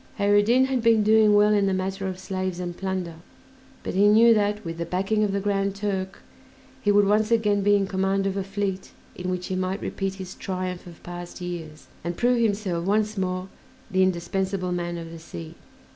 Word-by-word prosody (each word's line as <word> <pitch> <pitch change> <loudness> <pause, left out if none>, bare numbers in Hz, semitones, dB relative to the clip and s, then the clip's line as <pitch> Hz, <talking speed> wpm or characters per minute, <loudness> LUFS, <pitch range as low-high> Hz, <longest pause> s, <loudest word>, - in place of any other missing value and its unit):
Kheyr 205 0 +3
ed 205 - +2
Din 250 +4 +4
had 265 -2 0
been 225 -2 +4
doing 215 0 +5
well 210 +1 +5
in 200 -1 +3
the 190 - +1
matter 190 +1 -2
of 185 -1 -4
slaves 185 -1 -3
and 175 -1 -4
plunder, 185 -3 -4 0.7
but - - -4
he 200 +2 +4
knew 230 +3 +7
that, 210 0 0
with 165 0 -5
the 170 - -2
backing 195 +4 0
of 205 - +1
the 200 - 0
Grand 200 0 0
Turk, 195 -2 -3 0.6
he 205 - +2
would 205 0 +5
once 210 +2 +2
again 210 -3 +2
be 205 +1 +4
in 200 -1 +2
command 195 0 0
of 195 -1 -1
a 195 - -1
fleet 195 -1 -4 0.2
in 180 0 -4
which 180 0 -2
he 190 - -3
might 185 +1 -1
repeat 195 -1 -3
his 190 -1 -7
triumph 185 -2 -4
of 170 -2 -13
past 175 +1 -8
years, 170 -4 -7 0.2
and 170 +1 -4
prove 245 0 +2
himself 200 -6 0
once 215 +3 +1
more 185 -1 -2 0.4
the 190 0 +2
indispensable 185 +1 0
"man 175 -1 -2
of 165 -1 -7
the 165 - -9
sea." 85 - -9
195 Hz, 210 wpm, -25 LUFS, 180-205 Hz, 0.7 s, knew